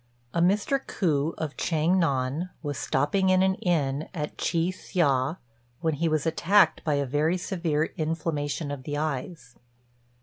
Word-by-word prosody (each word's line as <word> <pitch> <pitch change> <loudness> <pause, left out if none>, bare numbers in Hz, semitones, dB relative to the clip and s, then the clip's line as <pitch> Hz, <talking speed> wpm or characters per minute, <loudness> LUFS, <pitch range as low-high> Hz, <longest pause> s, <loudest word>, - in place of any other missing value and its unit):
A 170 - +1
Mr. 205 +9 +2
Ku, 155 -3 0
of 155 -2 -4
Chiang 165 +3 +2
nan, 140 +2 0
was 145 -2 -3
stopping 185 +8 +1
in 185 0 +4
an 190 0 +3
inn 155 -6 -1
at 150 -2 -4
Chi 170 +1 0
hsia, 150 -5 0 0.4
when 160 -2 +1
he 165 +3 0
was 155 -1 0
attacked 175 +5 +3
by 150 -2 +1
a 140 0 0
very 150 +6 +1
severe 165 -4 -1
inflammation 155 -2 -2
of 140 -2 -5
the 145 +2 -4
eyes. 140 -3 -4
160 Hz, 155 wpm, -27 LUFS, 145-175 Hz, 0.4 s, in